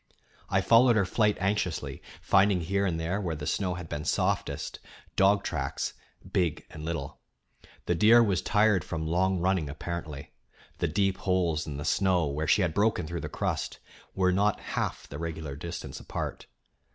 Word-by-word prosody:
I -, -, +2 dB
followed 120 Hz, +1 st, +6 dB
her 100 Hz, -3 st, +3 dB
flight 105 Hz, +2 st, +2 dB
anxiously, 95 Hz, -3 st, -1 dB, 0.2 s
finding 100 Hz, -2 st, +4 dB
here 100 Hz, +4 st, 0 dB
and 80 Hz, -3 st, -1 dB
there, 90 Hz, +5 st, -1 dB
where 85 Hz, -4 st, -2 dB
the 75 Hz, 0 st, -6 dB
snow 90 Hz, +1 st, -1 dB
had 90 Hz, -2 st, -7 dB
been 75 Hz, -1 st, -4 dB
softest, -, -, -1 dB, 0.4 s
dog 100 Hz, +1 st, +4 dB
tracks -, -, -2 dB, 0.4 s
big 90 Hz, -5 st, 0 dB
and 75 Hz, -, -9 dB
little. 85 Hz, +1 st, -4 dB, 0.7 s
The -, -, +1 dB
deer 110 Hz, +7 st, +6 dB
was 100 Hz, -6 st, +1 dB
tired 105 Hz, -3 st, +3 dB
from 80 Hz, -2 st, -4 dB
long 95 Hz, +4 st, +1 dB
running, 90 Hz, -3 st, +1 dB
apparently; 80 Hz, -2 st, -6 dB, 0.5 s
the -, -, +1 dB
deep 95 Hz, +3 st, +1 dB
holes 85 Hz, -5 st, 0 dB
in 70 Hz, -2 st, -5 dB
the 75 Hz, -, -5 dB
snow, 95 Hz, -4 st, +2 dB
where 75 Hz, +2 st, -2 dB
she 100 Hz, -, +4 dB
had 85 Hz, -3 st, 0 dB
broken 105 Hz, -2 st, +2 dB
through 85 Hz, +1 st, -4 dB
the -, -, -5 dB
crust, -, -, -2 dB, 0.4 s
were 95 Hz, -1 st, +3 dB
not 100 Hz, +3 st, +2 dB
half -, -, -2 dB
the 70 Hz, -, -8 dB
regular 80 Hz, -4 st, -5 dB
distance 85 Hz, +4 st, -6 dB
apart. -, -, -5 dB
90 Hz, 170 wpm, -28 LUFS, 80-100 Hz, 0.7 s, followed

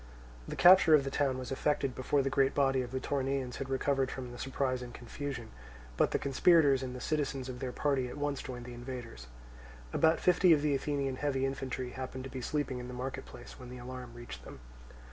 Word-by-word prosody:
The -, -, -4 dB
capture 175 Hz, -3 st, +8 dB
of 145 Hz, -, +3 dB
the 135 Hz, -, -3 dB
town 135 Hz, -3 st, +1 dB
was 130 Hz, 0 st, -6 dB
effected 135 Hz, -1 st, 0 dB
before 135 Hz, +2 st, +1 dB
the 135 Hz, -, -1 dB
great 135 Hz, 0 st, +2 dB
body 135 Hz, -2 st, +3 dB
of 125 Hz, -, -5 dB
the 130 Hz, -, -2 dB
Toronaeans 135 Hz, -2 st, -2 dB
had 135 Hz, 0 st, -5 dB
recovered 135 Hz, 0 st, +1 dB
from 130 Hz, -2 st, -6 dB
their 120 Hz, -, -9 dB
surprise 130 Hz, -1 st, -1 dB
and 125 Hz, -1 st, -7 dB
confusion; 120 Hz, 0 st, -6 dB, 0.4 s
but -, -, +3 dB
the -, -, +1 dB
conspirators 140 Hz, -1 st, +4 dB
and 125 Hz, -1 st, -5 dB
the -, -, -6 dB
citizens 140 Hz, -2 st, -1 dB
of 125 Hz, -1 st, -6 dB
their 130 Hz, -1 st, -3 dB
party 135 Hz, -2 st, 0 dB
at 125 Hz, -, -8 dB
once 145 Hz, -1 st, -1 dB
joined 125 Hz, -2 st, -7 dB
the 125 Hz, -, -8 dB
invaders. 120 Hz, -, -8 dB, 0.7 s
About 160 Hz, +1 st, +4 dB
fifty 180 Hz, -1 st, +5 dB
of 150 Hz, -2 st, +2 dB
the 150 Hz, -1 st, +2 dB
Athenian 140 Hz, -1 st, -1 dB
heavy 135 Hz, -2 st, 0 dB
infantry 130 Hz, -2 st, -3 dB
happened 130 Hz, 0 st, -6 dB
to 135 Hz, -, -7 dB
be 130 Hz, -, -5 dB
sleeping 135 Hz, -1 st, -2 dB
in 125 Hz, -, -6 dB
the 125 Hz, -, -7 dB
market 130 Hz, +1 st, -4 dB
place -, -, -11 dB
when 125 Hz, -, -9 dB
the 125 Hz, -, -8 dB
alarm 125 Hz, -1 st, -8 dB
reached 120 Hz, 0 st, -9 dB
them. -, -, -11 dB
130 Hz, 220 wpm, -32 LUFS, 125-140 Hz, 0.7 s, capture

